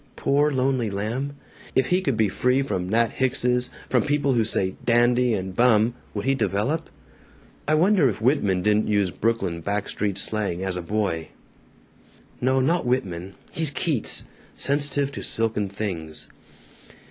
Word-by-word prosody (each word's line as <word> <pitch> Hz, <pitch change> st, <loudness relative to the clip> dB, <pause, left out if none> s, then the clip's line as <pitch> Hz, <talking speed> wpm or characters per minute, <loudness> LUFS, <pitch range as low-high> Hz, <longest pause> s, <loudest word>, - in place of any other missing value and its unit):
Poor 145 Hz, +2 st, +2 dB
lonely 130 Hz, -3 st, +1 dB
lamb! 115 Hz, +8 st, -3 dB, 0.4 s
If 130 Hz, -1 st, +2 dB
he 180 Hz, +1 st, +2 dB
could 135 Hz, -11 st, -1 dB
be 110 Hz, -, +3 dB
free 125 Hz, +7 st, +1 dB
from 90 Hz, -9 st, -3 dB
Nat 115 Hz, +2 st, +2 dB
Hickses, 125 Hz, -1 st, +1 dB, 0.2 s
from -, -, +2 dB
people 145 Hz, -2 st, +1 dB
who 115 Hz, -2 st, +3 dB
say 95 Hz, -3 st, 0 dB
'dandy' 120 Hz, 0 st, +3 dB
and 95 Hz, -1 st, -5 dB
'bum,' 115 Hz, -1 st, +4 dB, 0.2 s
would 100 Hz, -, -3 dB
he 135 Hz, -, +3 dB
develop? 135 Hz, +6 st, -1 dB, 0.8 s
"I 155 Hz, -, +3 dB
wonder 175 Hz, -3 st, +4 dB
if 105 Hz, -, -4 dB
Whitman 105 Hz, -7 st, +1 dB
didn't 105 Hz, +1 st, +2 dB
use 100 Hz, -3 st, +1 dB
Brooklyn 110 Hz, -7 st, -1 dB
back 100 Hz, +3 st, -2 dB
street 100 Hz, -2 st, -2 dB
slang, 95 Hz, -3 st, -1 dB
as 95 Hz, -1 st, 0 dB
a 90 Hz, -, -3 dB
boy? 85 Hz, -4 st, -2 dB, 1.1 s
"No. 130 Hz, +1 st, +2 dB
Not 165 Hz, +7 st, +2 dB
Whitman. 95 Hz, -7 st, -2 dB, 0.2 s
He's 160 Hz, -2 st, +1 dB
Keats 145 Hz, -4 st, 0 dB, 0.3 s
sensitive 140 Hz, 0 st, 0 dB
to -, -, -6 dB
silken 110 Hz, -3 st, -1 dB
things. 90 Hz, -6 st, -4 dB
115 Hz, 150 wpm, -24 LUFS, 100-135 Hz, 1.1 s, bum